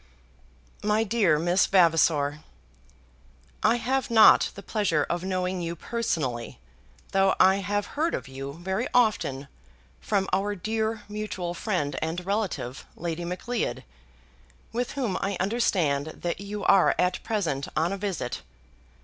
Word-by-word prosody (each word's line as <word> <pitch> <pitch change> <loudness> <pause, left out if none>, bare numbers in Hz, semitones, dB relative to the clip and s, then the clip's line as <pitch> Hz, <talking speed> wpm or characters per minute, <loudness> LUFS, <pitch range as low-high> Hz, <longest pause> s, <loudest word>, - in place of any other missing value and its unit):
MY 210 +1 +2
DEAR 200 -8 +2
MISS 175 +4 +2
VAVASOR, 160 -5 +3 1.2
I 225 +2 +4
have 260 +3 -1
not 225 -2 +7
the 200 - -9
pleasure 190 -9 +1
of 175 +1 -2
knowing 185 -1 -1
you 170 0 -3
personally, 155 - -3 0.5
though 195 0 +3
I 190 +1 +6
have 205 +1 -1
heard 320 +3 0
of - - -6
you 135 +1 -7
very 190 - -2
often 205 - +2 0.5
from 195 -2 0
our 205 +1 +1
dear 220 +2 -2
mutual 210 -4 -4
friend 175 -6 -2
and 165 +3 -3
relative 195 - -2
Lady 170 0 -4
Macleod, 215 +7 -3 0.9
with 245 +1 -2
whom 245 -9 -1
I 195 -1 -1
understand 180 -9 +1
that 175 +3 -4
you 205 0 -5
are 195 -2 +5
at 180 0 +1
present 165 - -2
on 170 +4 +1
a - - -3
visit. 185 -11 -3
190 Hz, 130 wpm, -26 LUFS, 165-215 Hz, 1.2 s, not